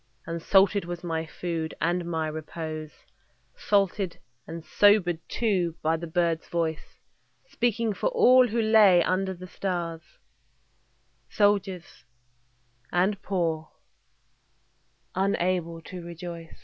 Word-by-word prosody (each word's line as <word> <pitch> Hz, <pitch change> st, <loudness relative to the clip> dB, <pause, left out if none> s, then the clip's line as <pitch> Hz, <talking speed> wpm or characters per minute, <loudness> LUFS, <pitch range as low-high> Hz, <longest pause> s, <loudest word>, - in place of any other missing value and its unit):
And 165 Hz, 0 st, -4 dB
salted 195 Hz, +2 st, +4 dB
was 175 Hz, 0 st, -6 dB
my 165 Hz, -2 st, -2 dB
food, 165 Hz, -2 st, -4 dB
and 175 Hz, 0 st, 0 dB
my 160 Hz, -2 st, -2 dB
repose, 155 Hz, 0 st, -6 dB, 0.7 s
Salted 195 Hz, -2 st, 0 dB, 0.3 s
and 165 Hz, 0 st, -7 dB
sobered 200 Hz, -5 st, +4 dB
too, 185 Hz, -8 st, 0 dB
by 160 Hz, +1 st, +2 dB
the 170 Hz, +1 st, -5 dB
bird's 170 Hz, -1 st, 0 dB
voice 165 Hz, -2 st, -3 dB, 0.5 s
Speaking 235 Hz, -, 0 dB
for -, -, -1 dB
all 255 Hz, -, +6 dB
who 230 Hz, +1 st, -1 dB
lay 210 Hz, -5 st, +6 dB
under 190 Hz, +1 st, 0 dB
the 180 Hz, +1 st, -10 dB
stars, 175 Hz, -3 st, -3 dB, 1.3 s
Soldiers 195 Hz, -, 0 dB, 0.9 s
and 190 Hz, +4 st, +1 dB
poor, 165 Hz, -5 st, -2 dB, 1.4 s
unable 180 Hz, -3 st, 0 dB
to 180 Hz, 0 st, -8 dB
rejoice. 170 Hz, -1 st, -8 dB
175 Hz, 110 wpm, -27 LUFS, 165-200 Hz, 1.4 s, all